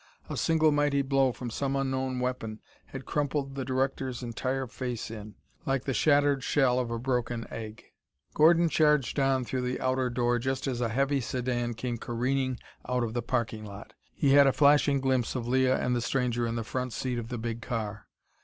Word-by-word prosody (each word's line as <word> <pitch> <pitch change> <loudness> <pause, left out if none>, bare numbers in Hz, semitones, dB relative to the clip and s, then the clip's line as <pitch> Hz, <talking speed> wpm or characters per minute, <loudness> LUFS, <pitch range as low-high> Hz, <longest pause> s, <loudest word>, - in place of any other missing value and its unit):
A - - -2
single 160 -1 +3
mighty 145 -1 +2
blow 135 -1 +2
from 120 0 -6
some 135 +3 -1
unknown 130 -1 -1
weapon 125 -4 -3 0.3
had 135 -1 -8
crumpled 145 -2 -1
the 135 -1 -3
director's 130 -1 -2
entire 130 +3 -2
face 125 -2 -5
in, 105 -2 -8 0.3
like 135 -1 0
the 135 - -2
shattered 145 -1 +3
shell 130 -3 +2
of 125 -2 -2
a 115 - -2
broken 120 -1 -2
egg. 110 -1 -7 0.5
Gordon 170 +2 +5
charged 150 -4 +2
on 135 -2 +2
through 130 +1 -2
the 125 0 -2
outer 130 0 0
door 120 0 +1
just 130 +2 -2
as 125 -3 -2
a 115 - +1
heavy 140 +4 +1
sedan 120 -1 -2
came 120 0 -3
careening 130 +2 -1 0.3
out 125 -1 +1
of 110 -1 -3
the 120 - -1
parking 115 -2 -2
lot. 105 0 -10 0.2
He 140 - +2
had 140 0 +7
a 135 - +3
flashing 145 -1 +4
glimpse 130 -2 0
of 120 -2 -3
Leah 130 +1 +3
and 125 0 0
the 120 - 0
stranger 120 -1 0
in 115 - -2
the 115 - -2
front 125 +2 -3
seat 125 -2 -2
of 115 - -6
the 125 - -3
big 115 0 -4
car. 110 -3 -4
130 Hz, 195 wpm, -28 LUFS, 120-135 Hz, 0.5 s, had